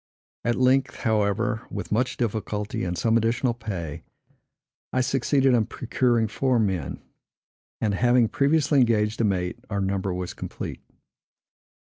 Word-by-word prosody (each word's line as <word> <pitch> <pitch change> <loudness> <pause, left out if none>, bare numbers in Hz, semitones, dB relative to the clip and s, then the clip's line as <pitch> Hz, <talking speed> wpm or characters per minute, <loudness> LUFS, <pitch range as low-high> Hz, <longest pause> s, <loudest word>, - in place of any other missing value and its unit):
At 120 0 +1
length, 130 +1 +2
however, 110 -1 0
with - - -6
much 125 +4 0
difficulty, 105 -2 -2
and 90 -1 -2
some 115 +6 +3
additional 115 +2 +1
pay, 95 -10 -5 0.9
I 130 - +1
succeeded 135 +1 +2
in 115 -3 +2
procuring 120 -2 +1
four 130 +3 +1
men; 95 -9 -1 0.8
and, 105 -2 0
having 120 +2 +4
previously 145 +3 +2
engaged 110 -2 +2
a - - +3
mate, 90 +1 -1
our 100 -1 -1
number 95 0 -1
was 90 0 -4
complete. - - -6
115 Hz, 130 wpm, -25 LUFS, 100-125 Hz, 0.9 s, having